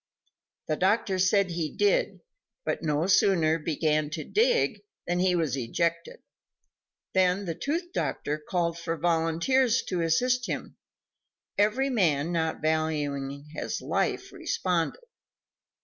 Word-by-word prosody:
The 155 - 0
doctor 190 0 +1
said 190 0 +3
he 165 -2 -2
did, - - +2 0.4
but - - -1
no 150 0 0
sooner 170 -4 +3
began 155 -1 0
to 155 0 -4
dig 475 +2 +2 0.2
than 175 0 0
he 180 0 +3
was 160 -6 0
ejected. 170 +7 -2 0.9
Then 185 +1 +2
the 170 - -2
tooth 335 - -3
doctor 150 +1 -2
called 170 +1 -1
for 165 0 -3
volunteers 170 - +2
to 180 -2 -1
assist 245 +10 +1
him; - - -5 0.8
every 245 +7 +2
man 165 - +2
not 160 -2 -1
valuing 145 -3 -1
his - - -3
life 390 0 -1
responded. 185 - -1
170 Hz, 120 wpm, -27 LUFS, 155-205 Hz, 0.9 s, said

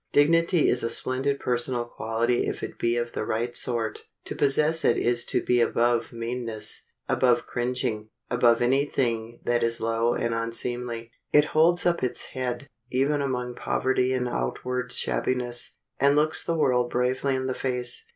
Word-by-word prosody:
Dignity 165 +3 +3
is 125 - +2
a 115 - -1
splendid 130 +4 0
personal 120 0 0
quality 115 +1 -1
if - - -4
it - - -6
be 120 0 +1
of 120 0 -2
the - - -3
right 120 +3 -2
sort. 115 -3 -1 0.2
To - - -5
possess 150 +3 +3
it - - +3
is 120 0 +1
to - - 0
be 125 -1 +2
above 120 0 +1
meanness, 115 -2 -2 0.3
above 120 -2 +2
cringing, 120 -3 -2 0.2
above 120 -1 +3
any 135 +3 +3
thing 120 -4 -2
that 120 0 +1
is 115 0 +1
low 115 +1 0
and 115 -1 -1
unseemly. 115 0 -3 0.2
It 150 0 +5
holds 170 +3 +4
up 175 -1 +2
its 125 - -1
head, 130 +1 -3 0.2
even 140 +3 +1
among 125 -3 -2
poverty 130 +1 0
and 125 -1 0
outward 125 - -3
shabbiness, 120 - 0 0.2
and 140 +1 +4
looks 155 +1 +2
the 165 - -1
world 125 -5 +2
bravely 130 +3 0
in 130 0 -2
the 130 - -1
face. 125 -2 -2
125 Hz, 165 wpm, -26 LUFS, 120-130 Hz, 0.3 s, It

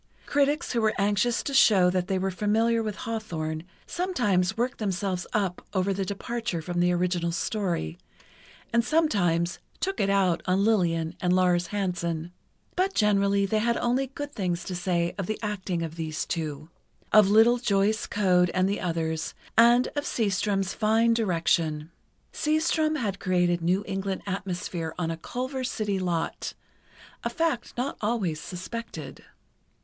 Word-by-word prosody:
Critics 290 +3 +1
who 235 - +1
were 215 -1 +2
anxious 205 +4 +1
to 280 - -3
show 190 -8 +6
that 180 0 -1
they 190 -1 0
were 190 +1 -1
familiar 225 +4 +1
with 215 -2 -3
Hawthorne, 170 -10 -4 0.2
sometimes 220 - 0
worked 245 +2 -1
themselves 190 -3 -2
up 195 -4 -1
over 190 +1 +1
the 195 0 -2
departure 205 -1 -3
from 175 +2 -3
the 175 0 +3
original 175 -1 0
story, 175 - -2 0.7
and 235 0 +4
sometimes 200 - +1 0.2
"took 390 0 -2
it 200 - +2
out" 190 -4 +2
on 185 +2 +2
Lillian 170 -7 +1
and 180 0 +2
Lars 180 -1 +3
Hansen, 175 -4 -2 0.4
but 380 +2 0
generally 200 -1 +3
they 215 +2 +1
had 235 +2 +1
only 255 +3 +1
good 290 +2 -7
things 180 -6 -2
to 185 - -5
say 175 -1 0
of 190 - -2
the 215 - -2
acting 190 -5 -2
of 165 0 -6
these 160 -1 -3
two, 155 -1 -4 0.4
of 210 -2 +7
little 225 +4 +5
Joyce 210 -1 +1
Coad 180 -3 +3
and 185 +1 +3
the 200 - -1
others, 160 -2 -2 0.2
and 240 +2 +6
of 290 -1 -3
Seastrom's 195 -2 0
fine 225 +1 +3
direction. 165 -6 0 0.4
Seastrom 310 0 +1
had 200 -6 -2
created 175 -2 +1
New 180 +4 +1
England 195 -1 -3
atmosphere 180 -4 -4
on 165 -2 -1
a 165 - -4
Culver 255 - -4
City 210 -5 -1
lot, 175 -3 -2 0.7
a - - 0
fact 325 -10 -2
not 255 +3 -2
always 205 -8 0
suspected. 185 -3 -7
195 Hz, 155 wpm, -27 LUFS, 175-230 Hz, 0.7 s, of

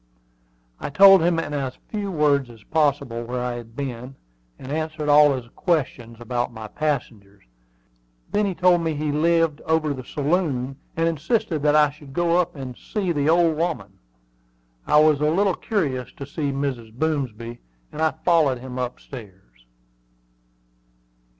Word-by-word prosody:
I - - -4
told 195 +4 +8
him 170 0 +2
in 165 -2 -3
as 135 -3 -3
few 205 -2 -3
words 145 -5 +2
as 115 -3 -15
possible 140 -6 0
where 125 +2 -4
I 125 -1 -2
had 115 -1 -11
been, 130 -1 -5 0.4
and 130 - -9
answered 155 -1 -2
all 145 -1 +6
his 125 -2 -6
questions 130 -9 -1
about 120 +1 -2
my 110 -2 -8
passengers. 110 -8 -4 0.9
Then 210 0 +1
he 190 - -3
told 180 -1 +4
me 160 -2 -1
he 150 0 -1
lived 165 0 +2
over 160 -2 +1
the 130 -2 -7
saloon, 140 -3 -1 0.2
and 165 0 +2
insisted 165 - -1
that 150 0 +3
I 150 -1 +5
should 145 -2 -14
go 170 +2 +2
up 175 -1 0
and 130 -3 -7
see 195 - -3
the 145 -2 +1
"old 165 -1 +4
woman." 170 0 -3 0.9
I 150 - +5
was 155 -2 +4
a 150 - +3
little 195 +4 +2
curious 140 - -2
to 140 - -8
see 145 0 -3
Mrs. 135 -5 -3
Boomsby, 120 -6 -2 0.3
and 155 - -6
I 160 - +4 0.2
followed 160 -7 +4
him 130 +1 -7
up 125 -1 -3
stairs. 95 - -13
145 Hz, 160 wpm, -23 LUFS, 125-165 Hz, 0.9 s, told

